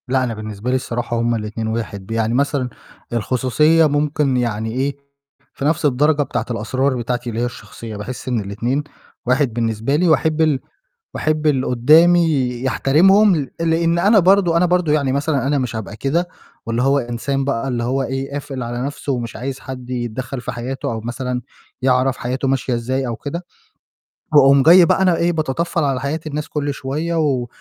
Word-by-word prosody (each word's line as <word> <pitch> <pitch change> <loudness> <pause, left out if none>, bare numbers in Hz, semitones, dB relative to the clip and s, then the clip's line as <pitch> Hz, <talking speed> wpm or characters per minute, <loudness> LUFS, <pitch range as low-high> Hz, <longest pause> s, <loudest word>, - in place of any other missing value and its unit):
لأ، 130 0 +1
أنا 120 -2 -2
بالنسبة 110 +1 -6
لي 130 - +2
الصراحة 120 -2 -2
هُم 120 0 +1
الاتنين 110 0 -4
واحد، 110 -3 -4
ب 115 - -11
يعني 115 0 0
مثلًا 140 -1 0 0.4
الخصوصية 130 +8 +3
ممكن 145 -2 +1
يعني 110 -2 -1
إيه، 135 +4 -2 0.6
في 140 - -5
نَفْس 155 +1 +1
الدرجة 145 +2 +3
بتاعة - - -3
الأسرار 130 +4 -1
بتاعتي 120 0 -3
اللي 115 0 -3
هي - - +1
الشخصية، 115 0 -8
باحس 125 +6 -7
إن 125 -3 0
الاتنين 115 +8 -2 0.4
واحد 125 0 +1
بالنسبة 115 +3 -1
لي 175 +4 +2
وأحب 160 0 +2
ال 155 -4 +2 0.6
وأحب 155 0 -1
اللي 135 -4 +2
قدّامي 155 +2 +4 0.2
يحترمهم 185 - +4
ل 145 -3 -3
لإن 165 +1 +1
أنا 205 +5 +5
برضه 185 -2 +4
أنا 175 +2 +4
برضه 175 -3 +1
يعني 140 -3 +1
مثلًا 140 -1 0
أنا 145 +1 +1
مش 125 -4 -3
هابقى 110 -1 -6
كده، 165 +9 -1 0.4
واللي 115 +1 -1
هو 135 +2 +3
إنسان 135 +2 -2
بقى 135 -1 -1
اللي 120 -2 -2
هو 130 +3 0
إيه، 135 +1 -4
قافل 140 -2 -5
على 120 +1 -4
نفْسُه 145 0 -4
ومش 120 -3 -4
عايز 130 +3 -5
حد 130 -2 -8
يتدخّل 125 +1 -4
في 120 - -5
حياتُه 125 +2 -4
أو 110 - -4
مثلًا 125 +2 -4 0.4
يعرف 130 0 +2
حياته 130 +2 -2
ماشية 130 -1 0
إزاي 130 +3 -2
أو 120 -2 -3
كده، 170 +8 -6 0.9
واقوم 140 -1 +6
جاي 175 +4 +8
بقى 180 - +2
أنا 185 -2 +4
إيه 170 +1 +2
باتطفّل 165 +1 -1
على 135 -3 0
حياة 140 +3 -2
الناس 150 0 -4
كُلّ 145 -1 -2
شوية 150 +6 -3
و 140 -6 0
135 Hz, 185 wpm, -19 LUFS, 120-150 Hz, 0.9 s, جاي